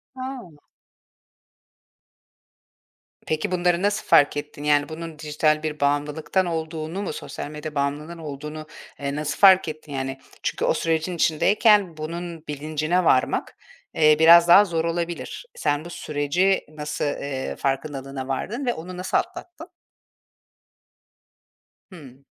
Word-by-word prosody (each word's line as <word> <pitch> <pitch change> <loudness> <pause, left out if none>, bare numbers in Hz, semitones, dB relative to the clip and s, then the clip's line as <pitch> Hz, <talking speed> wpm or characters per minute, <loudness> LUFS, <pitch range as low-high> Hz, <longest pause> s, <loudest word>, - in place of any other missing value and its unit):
A! 255 - -8 2.6
Peki, 155 +3 -2
bunları 180 -1 +1
nasıl 205 +1 0
fark 145 0 +5
ettin? 145 0 -6
Yani, 145 -1 +2
bunun 160 -1 -8
dijital 155 0 +1
bir 155 -1 -3
bağımlılıktan 145 +6 0
olduğunu 160 +1 -4
mu, 185 -6 -3
sosyal 145 - -7
medya 150 0 -7
bağımlılığının 145 +4 -2
olduğunu, 150 0 -7 0.3
eee, 140 0 -3
nasıl 150 0 -3
fark 190 -3 +7
ettin 155 -1 -7
yani? 135 0 -4 0.2
Çünkü - - -1
o - - +3
sürecin 165 +2 -1
içindeyken 190 +2 +3
bunun 165 +1 -6
bilincine 155 +4 -1
varmak, 130 -5 +1 0.4
eee, 155 -1 +5
biraz 170 +1 +8
daha 195 +4 +8
zor 165 -3 -1
olabilir. 170 - -4
Sen 150 - -1
bu - - -8
süreci 170 +5 0
nasıl, 150 -1 -4
ııı, 140 -2 -3
farkındalığına 135 -1 -3
vardın 215 - -3
ve 245 - +1
onu 180 +3 -8
nasıl 185 - 0
atlattın? 350 -1 -6 2.2
Hımm. 140 -6 -14
155 Hz, 125 wpm, -23 LUFS, 145-175 Hz, 2.6 s, biraz